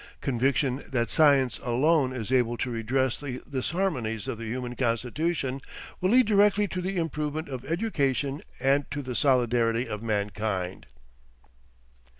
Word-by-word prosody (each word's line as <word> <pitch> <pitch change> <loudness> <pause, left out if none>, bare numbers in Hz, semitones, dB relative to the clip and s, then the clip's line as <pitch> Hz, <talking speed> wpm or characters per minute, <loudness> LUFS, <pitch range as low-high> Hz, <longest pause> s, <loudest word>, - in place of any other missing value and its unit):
Conviction 135 +1 0
that 120 -4 -1
science 140 -5 +4
alone 130 +3 +2
is 120 -2 -5
able 120 -2 +2
to 125 - -2
redress 120 +3 0
the 130 -3 -5
disharmonies 130 - -1
of 115 - -4
the 115 - -5
human 125 +1 -4
constitution 130 +4 -1 0.4
will 185 - +1
lead 250 +3 +6
directly 205 -1 +4
to 185 - -3
the 190 +1 -2
improvement 155 -1 -2
of 130 -3 -6
education 145 - -1 0.2
and 135 +2 +2
to 145 0 -4
the 125 -1 -4
solidarity 120 -3 +2
of 105 -2 -5
mankind. 100 -3 -2
130 Hz, 140 wpm, -27 LUFS, 120-150 Hz, 0.4 s, lead